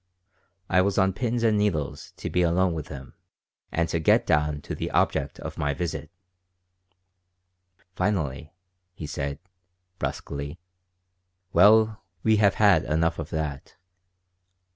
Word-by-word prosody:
I 95 -1 +4
was 100 +1 0
on 95 0 +3
pins 120 +3 -1
and 110 -2 +3
needles 85 -9 -1
to - - -5
be 90 - +2
alone 90 +1 +2
with 80 -3 -5
him 70 -3 -9 0.6
and 85 0 0
to 85 - 0
get 80 - +3
down 75 -1 +1
to - - -5
the - - -3
object - - 0
of - - -7
my 70 0 0
visit 75 -1 -4 1.9
Finally 80 -6 -1 0.4
he 80 - -7
said, 70 -1 -4 0.6
brusquely: 70 +3 -4 1.0
"Well, 110 +4 +5 0.2
we 110 -1 +4
have 100 -2 +4
had 100 -6 +5
enough 80 +2 0
of 80 0 -5
that. 75 -4 -4
85 Hz, 130 wpm, -26 LUFS, 75-100 Hz, 1.9 s, Well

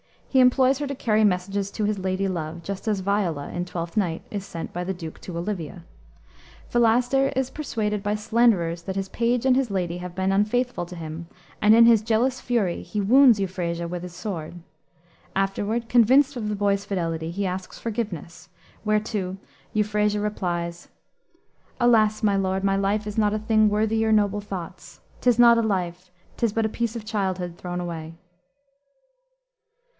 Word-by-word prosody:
He 265 - +3
employs 260 +1 +4
her 290 - -2
to 280 - -4
carry 220 -3 +2
messages 195 +1 0
to 215 - -3
his 210 -1 0
lady 190 +1 -1
love, 165 -2 -4
just 195 +5 -6
as 210 -3 0
Viola, 185 -7 -1
in 175 0 -3
Twelfth 170 +1 -5
Night, 170 -5 0
is 200 -2 -4
sent 165 -3 -7
by 175 - -3
the 190 +2 -2
Duke 165 -3 -8
to 175 -2 -7
Olivia. 170 -4 -4 0.9
Philaster 245 +3 +3
is 265 0 -1
persuaded 215 -8 -2
by 205 +1 -1
slanderers 210 -6 +2
that 190 +2 -5
his 195 0 -3
page 235 +3 0
and 260 -1 +5
his 265 -2 +1
lady 180 -3 -2
have 180 0 -7
been 190 +1 0
unfaithful 210 +1 0
to 180 - -9
him, 165 0 -7 0.3
and 215 +1 +6
in 230 0 +8
his 230 -2 +6
jealous 235 +4 +1
fury 225 -9 0
he 210 - -3
wounds 240 +1 +6
Euphrasia 175 -3 -2
with 175 0 -5
his 180 -1 -8
sword. 170 -5 -5 0.8
Afterward, 205 +4 -1
convinced 260 +4 +5
of 225 -4 -3
the 210 - -1
boy's 200 -1 0
fidelity, 165 -4 -2
he 195 +4 -2
asks 185 0 -4
forgiveness, 195 -6 -5 0.3
whereto 210 -3 -1 0.4
Euphrasia 210 0 +1
replies, 175 -5 -3 0.9
"Alas, 220 -3 +3
my 200 -2 +3
lord, 190 0 -1
my 195 0 +2
life 200 +2 0
is 210 0 -6
not 210 -1 +2
a - - -1
thing 215 0 +3
Worthy 215 +1 +1
your 220 0 +2
noble 205 -1 +2
thoughts. 190 -3 -8 0.2
'Tis 245 -2 +3
not 235 -1 +7
a - - +3
life, 180 -4 -2 0.3
'Tis 230 -4 0
but 225 0 +1
a - - 0
piece 235 +1 -2
of 225 -2 -6
childhood 190 -5 -2
thrown 180 0 -4
away." 165 -2 -6
205 Hz, 175 wpm, -24 LUFS, 180-225 Hz, 0.9 s, in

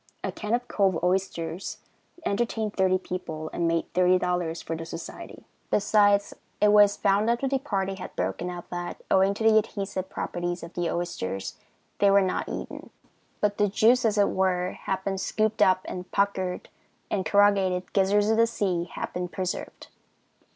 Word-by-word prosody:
A - - -2
can 215 +2 -1
of 245 0 -4
cove 195 -4 +2
oysters 180 -1 -1 0.5
entertained 220 0 -1
thirty 185 -1 +2
people 160 -4 -6
and 170 - 0
made 165 0 -1
$30 180 -2 +1
for 165 - -3
the 165 - -6
society. 165 +1 -9 0.2
Besides, 205 -1 +3 0.3
it 210 - +5
was 205 -1 +6
found 205 +2 +2
after 240 +3 +1
the 270 0 0
party 195 -8 -2
had 190 -1 -8
broken 95 - -2
up 175 -1 -7
that, 175 0 -5
owing 195 +1 +4
to 220 - -4
the 220 -1 +6
adhesive 195 -3 -4
properties 175 0 -4
of 170 - -9
the 175 -1 -1
oysters, 95 - -3 0.4
they 200 - +5
were 200 0 +6
not 185 - -2
eaten; - - -7 0.5
but 205 0 0
the 205 - +4
juice, 230 +5 +4
as 215 -2 +1
it 205 - +4
were, 185 -1 0
had 190 0 -4
been 195 -1 -2
scooped 215 +2 0
up 185 0 +5
and 180 0 -6
the - - -34
puckered 190 -2 -1 0.4
and 195 - 0
corrugated 190 0 +2
gizzards 205 +2 +3
of 220 - +2
the 230 0 +5
sea 185 -6 -1
had - - -4
been 180 0 -2
preserved. 185 +1 -5
190 Hz, 170 wpm, -26 LUFS, 180-205 Hz, 0.5 s, was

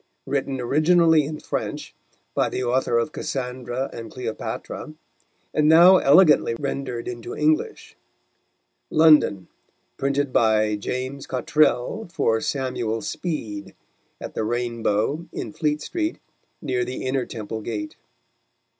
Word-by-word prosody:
Written 135 -1 -2
originally 155 +4 +4
in 155 +1 -5
French, - - -4 0.4
by - - +1
the 130 - -3
Author 120 -1 +1
of 115 +6 0
Cassandra 125 -1 -4
and 115 -1 -7
Cleopatra: 125 +5 -6 0.6
and 150 0 +3
now 175 +4 +8
elegantly 150 -6 +5
rendered 135 -4 -4
into 120 -1 -6
English. 155 +1 0 0.9
London: 150 - +4 0.5
Printed 140 -1 -1
by 110 -2 +3
Ja: 130 +5 -3
Cottrell 150 - +1
for 115 -10 +1
Samuel 125 -5 -2
Speed, 105 - -5 0.4
at - - -7
the - - -2
Rain 120 +1 -2
Bow 110 +11 0
in - - -6
Fleetstreet, 155 - -2 0.5
near 125 -2 0
the 125 +2 -5
Inner 130 0 -1
Temple 110 -1 -6
Gate. 105 -2 -5
130 Hz, 115 wpm, -23 LUFS, 115-150 Hz, 0.9 s, now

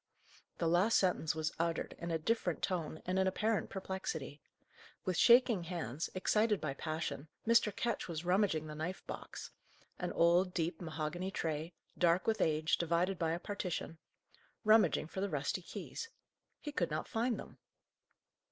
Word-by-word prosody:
The 170 - 0
last 180 +7 +4
sentence 175 -5 +1
was 160 +1 -1
uttered 165 0 -1
in 170 - -4
a 165 - +1
different 225 +9 0
tone 165 -5 -2
and 185 +1 +1
in 190 - +3
apparent 215 +3 0
perplexity. 185 -7 -4 0.6
With 185 - 0
shaking 235 -4 +6
hands, 165 -5 -3
excited 210 +2 +2
by 150 -3 -2
passion, 155 0 -4 0.2
Mr. 230 -2 +5
Ketch 240 -2 -1
was 165 -1 -4
rummaging 180 -4 +2
the 155 - -6
knife 160 +5 -4
box - - -7 0.5
an - - -2
old, 175 +2 +4
deep, 165 0 -1
mahogany 165 +2 -3
tray, 160 -2 -3 0.2
dark 175 +1 +3
with 220 -1 +1
age, 155 0 +2
divided 170 +2 +1
by 165 -1 +1
a 170 - -2
partition 180 -4 -4 0.6
rummaging 215 -6 +5
for 190 +4 -5
the 200 - 0
rusty 145 +3 -1
keys. 460 - -6 0.5
He 295 - -5
could 180 -12 0
not 155 0 -3
find 235 +1 0
them. - - -10
175 Hz, 155 wpm, -35 LUFS, 160-195 Hz, 0.6 s, shaking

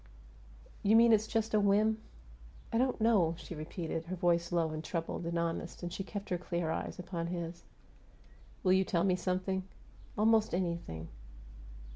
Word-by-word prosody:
"You 210 +2 +4
mean 230 0 +7
it's 215 0 +3
just 220 -1 -1
a 215 - +5
whim?" 210 +2 +3 0.7
"I 230 - +3
don't 255 0 +1
know," 205 -8 +3
she 170 0 -8
repeated. 165 +1 -4
Her 185 +2 -4
voice 170 -1 +2
was - - -15
low 165 -2 +2
and 155 0 -4
troubled 165 0 -3
and 170 0 -1
honest, 170 +1 -3
and 175 0 -4
she 195 - -3
kept 200 +1 -6
her 180 - 0
clear 170 -2 -2
eyes - - -3
upon 175 -2 -4
his. 170 -1 -5 1.0
"Will 185 -2 +5
you 190 0 +4
tell 170 -2 +1
me 190 -2 +3
something?" 185 +1 -1 0.6
"Almost 220 -2 +4
anything." 170 - -3
180 Hz, 170 wpm, -33 LUFS, 170-205 Hz, 1.0 s, mean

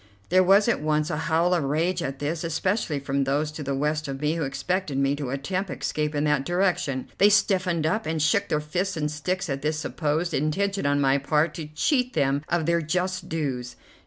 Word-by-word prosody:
There 185 +1 +5
was 195 +3 +5
at 235 - +1
once 150 0 0
a - - -1
howl 170 +3 +3
of 170 -4 +1
rage 165 +6 0
at 135 -4 -3
this, 155 +4 -3
especially 165 -1 -1
from 140 0 -1
those 145 +3 0
to 155 - -7
the 140 -1 -2
west 150 +2 -1
of 135 -1 -5
me, 150 +2 +1
who 165 - -3
expected 170 +2 -2
me 140 +1 +2
to 145 -3 -4
attempt 180 +9 -2
escape 150 0 -2
in 145 - +1
that 150 -2 +2
direction. 175 -6 0
They 205 - +7
stiffened 185 -6 +2
up, 215 +8 0
and 160 0 -1
shook 160 +7 +2
fists 180 +4 -2
and 150 -1 -1
sticks 180 +5 -2
at 135 -2 -3
this 155 +1 -1
supposed 155 +1 -1
intention 195 +5 0
on 145 0 +2
my 135 0 +3
part 150 +3 +1
to 155 -1 -6
cheat 250 - 0
them 140 0 +1
of 175 -2 +1
their 170 +1 +2
just 180 +3 -2
dues. 130 -6 -3
155 Hz, 210 wpm, -25 LUFS, 145-180 Hz, -, They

